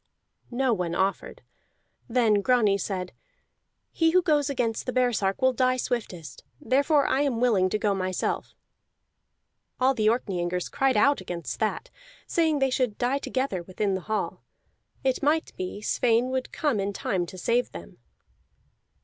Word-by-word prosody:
No 255 0 +1
one 175 -4 -2
offered. 190 +2 -2 0.7
Then 225 -4 +3
Grani 215 -4 +3
said: 185 -2 -4 0.8
"He 325 -1 +2
who 365 +2 +3
goes 300 -4 +2
against 240 -4 -2
the - - 0
baresark 240 -4 0
will 260 0 +4
die 255 +1 +2
swiftest, 180 - -4 0.2
therefore 285 +2 +2
I 275 - +1
am 270 -5 0
willing 210 -7 +3
to 215 - 0
go 210 -1 +1
myself." 185 -1 -2 1.2
All 260 +1 +4
the 215 -4 0
Orkneyingers 180 -6 -2
cried 270 -4 +2
out 280 +2 +3
against 175 -2 -5
that, - - -2 0.3
saying 320 -3 +1
they 270 -1 +1
should 250 -5 0
die 255 +3 0
together 260 -10 -2
within 190 +3 -2
the 190 - -2
hall; 215 +3 -3 0.6
it 260 -1 0
might 305 +3 +1
be 185 +3 -5
Sweyn 240 +3 +1
would 260 -1 -2
come 290 -9 0
in 200 +1 -2
time 185 -2 -2
to 185 - -10
save 235 +7 0
them. 85 -8 -11
235 Hz, 150 wpm, -26 LUFS, 195-265 Hz, 1.2 s, will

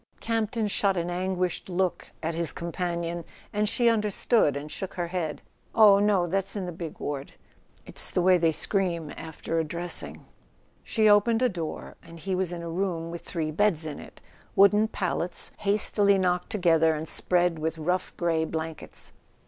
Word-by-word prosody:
Campton 225 -1 -1
shot 200 -1 +1
an 170 +1 -2
anguished 185 0 -2
look 185 0 -1
at 165 +1 -1
his 170 0 0
companion, 170 0 -3 0.3
and 210 0 +2
she 240 +1 +2
understood 210 - +2
and 150 +1 -7
shook 190 - -5
her 175 -2 -1
head. 170 -4 -3 0.3
"Oh, 210 -3 +7
no: 200 -3 +3
that's 195 +3 -1
in 195 -3 -3
the 180 - -4
big 165 -2 -7
ward. 140 -1 -5 0.5
It's - - +1
the 180 - 0
way 185 0 +5
they 165 -1 +3
scream 170 -2 -1
after 160 +1 -4
a - - +1
dressing..." 170 +3 -1 0.6
She 220 -2 +2
opened 225 +3 +4
a 250 - +4
door, 170 -6 -6
and 165 0 -13
he 190 +4 -3
was 185 -1 0
in 170 -1 -5
a - - -5
room 170 -2 -2
with 170 - -6
three 160 -3 -3
beds 170 -2 +2
in 150 -2 -5
it, - - -13 0.3
wooden 205 +2 +5
pallets 180 -4 -2
hastily 200 -1 +3
knocked 180 -1 0
together 165 -6 +3
and 155 +1 -5
spread 175 -2 +1
with 160 +1 -2
rough 180 +4 -1
grey 165 -2 +1
blankets. 160 -1 -6
180 Hz, 175 wpm, -27 LUFS, 165-200 Hz, 0.6 s, Oh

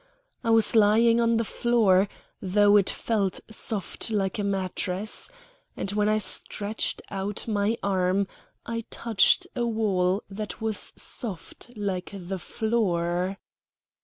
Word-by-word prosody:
I 230 - -1
was 225 0 +5
lying 225 +2 +5
on 230 0 +3
the 230 - +1
floor, 210 -5 +3 0.3
though 205 +2 +4
it 200 -2 +4
felt 205 -5 -1
soft 220 -1 -1
like 200 -2 -1
a - - 0
mattress, 195 - -1 0.5
and 195 - -2
when 210 0 +1
I 215 - +3
stretched 210 0 -1
out 195 +2 -4
my 210 +1 0
arm 190 0 +1 0.4
I 230 0 -3
touched 225 -5 +2
a 240 -2 0
wall 200 -4 +1
that 210 +2 -6
was 220 -2 0
soft 215 0 -5
like 195 -3 -3
the 190 0 -5
floor. 185 -5 -1
205 Hz, 130 wpm, -26 LUFS, 190-225 Hz, 0.5 s, was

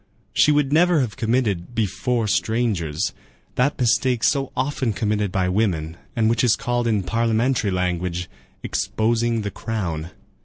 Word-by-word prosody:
She 150 - +4
would 145 -1 +2
never 170 -1 +4
have 120 -5 -2
committed 115 -4 -1
"before 115 +2 0
strangers" 100 -7 0 0.4
that 135 +4 +1
mistake 125 -1 +2
so 135 +4 +1
often 130 -3 0
committed 105 -1 -1
by 95 -1 0
women, 90 -5 0 0.2
and 110 -1 +2
which 115 +2 +2
is 120 -3 +4
called 120 -1 -1
in 105 -4 +1
parliamentary 115 +3 +1
language, 90 -1 -1 0.4
"exposing 115 0 0
the 100 - -3
crown." 85 -7 -4
110 Hz, 140 wpm, -22 LUFS, 95-125 Hz, 0.4 s, She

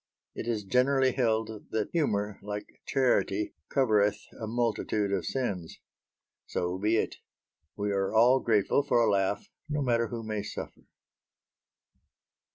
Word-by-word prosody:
It - - -6
is 110 -3 -1
generally 130 +5 +3
held 110 -4 -1
that 110 -2 -2
humour, 105 - 0
like 105 0 -7
charity, 115 -6 +1 0.2
covereth 105 -6 +3 0.2
a 110 - -3
multitude 110 -3 0
of 95 - -1
sins. 100 -11 -3 0.7
So 90 +1 -2
be 110 +3 +2
it. - - -1 0.6
We 105 0 -1
are 95 -1 0
all 120 +4 +5
grateful 110 +2 +2
for 140 -4 +2
a 115 -2 +4
laugh 100 0 0 0.2
no 150 -1 0
matter 115 -2 +2
who 115 +1 -5
may 110 -1 -2
suffer. 100 - -8
110 Hz, 135 wpm, -29 LUFS, 100-120 Hz, 0.7 s, all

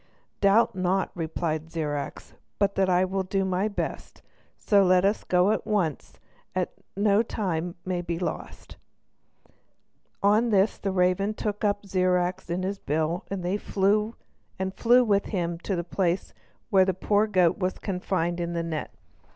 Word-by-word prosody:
"Doubt 215 +4 +4
not," 185 0 0
replied 160 -1 -3
Zirac, 150 -3 -3 0.3
"but 200 -1 +2
that 190 -1 +1
I 180 +1 +4
will 190 +1 -1
do 190 +1 -1
my 190 +2 0
best, 205 - -5 0.3
so 205 -2 +3
let 185 0 +4
us 205 +2 +1
go 180 +3 +3
at 215 - 0
once 185 -9 -1 0.4
that - - -1 0.2
no 205 +1 +4
time 180 -7 -2
may 180 -1 -1
be 170 -1 -3
lost." 175 - -6 1.5
On 215 +4 +4
this 200 0 +2
the 200 - -2
raven 190 +3 +1
took 210 -1 -3
up 205 -1 0
Zirac 185 -1 0
in 175 +2 -1
his 195 +1 -3
bill, 160 +4 -1
and 195 -2 -4 0.2
flew 210 +2 +1
with 200 -3 +2
him 170 -4 -2
to 190 +2 -2
the 170 - -2
place 180 +1 -1 0.4
where 190 -1 +6
the 190 -2 0
poor 205 +3 +2
goat 185 -4 +2
was 185 -1 -1
confined 180 -3 -2
in 170 0 -2
the 170 0 -1
net. 160 -2 -4
190 Hz, 150 wpm, -26 LUFS, 175-200 Hz, 1.5 s, where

